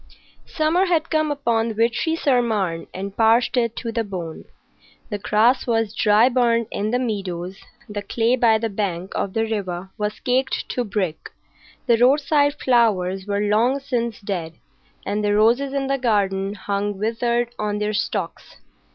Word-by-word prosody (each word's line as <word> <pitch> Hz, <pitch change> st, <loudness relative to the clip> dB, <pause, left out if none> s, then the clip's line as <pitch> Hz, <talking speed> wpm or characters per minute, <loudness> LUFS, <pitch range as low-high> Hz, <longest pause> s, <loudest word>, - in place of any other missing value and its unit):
Summer 325 Hz, +4 st, +1 dB
had 330 Hz, -2 st, 0 dB
come 310 Hz, -1 st, +1 dB
upon 235 Hz, -6 st, 0 dB
Vitry 235 Hz, +8 st, +1 dB
sur 270 Hz, -6 st, +2 dB
Marne 195 Hz, -8 st, -2 dB
and 195 Hz, +1 st, -6 dB
parched 230 Hz, +2 st, +3 dB
it 235 Hz, -2 st, +1 dB
to 230 Hz, -, -4 dB
the 230 Hz, 0 st, -1 dB
bone. 180 Hz, -6 st, -7 dB, 0.7 s
The 205 Hz, -, -2 dB
grass 225 Hz, +6 st, +2 dB
was 225 Hz, -3 st, 0 dB
dry 215 Hz, +1 st, +4 dB
burnt 235 Hz, -3 st, +1 dB
in 205 Hz, +1 st, -2 dB
the 245 Hz, -, +1 dB
meadows, 195 Hz, -6 st, -4 dB, 0.3 s
the 210 Hz, -2 st, -5 dB
clay 230 Hz, +3 st, +1 dB
by 230 Hz, -3 st, +4 dB
the 225 Hz, +1 st, -2 dB
bank 190 Hz, -3 st, -3 dB
of 190 Hz, -, -2 dB
the 225 Hz, 0 st, +1 dB
river 190 Hz, -4 st, -4 dB
was 210 Hz, 0 st, -2 dB
caked 260 Hz, +1 st, 0 dB
to 245 Hz, -, -1 dB
brick, 195 Hz, -7 st, -3 dB, 0.6 s
the 235 Hz, -, +4 dB
roadside 285 Hz, +3 st, +3 dB
flowers 195 Hz, -6 st, +1 dB
were 200 Hz, 0 st, 0 dB
long 225 Hz, +6 st, +2 dB
since 235 Hz, -4 st, -2 dB
dead, 180 Hz, -5 st, -4 dB, 0.5 s
and 210 Hz, +1 st, -1 dB
the 205 Hz, 0 st, +2 dB
roses 235 Hz, +6 st, +3 dB
in 275 Hz, 0 st, -1 dB
the 275 Hz, 0 st, -1 dB
garden 200 Hz, -4 st, 0 dB
hung 200 Hz, 0 st, -2 dB
withered 235 Hz, +3 st, -1 dB
on 210 Hz, -1 st, -1 dB
their 210 Hz, 0 st, -1 dB
stalks. 200 Hz, -4 st, -3 dB
225 Hz, 160 wpm, -22 LUFS, 200-245 Hz, 0.7 s, dry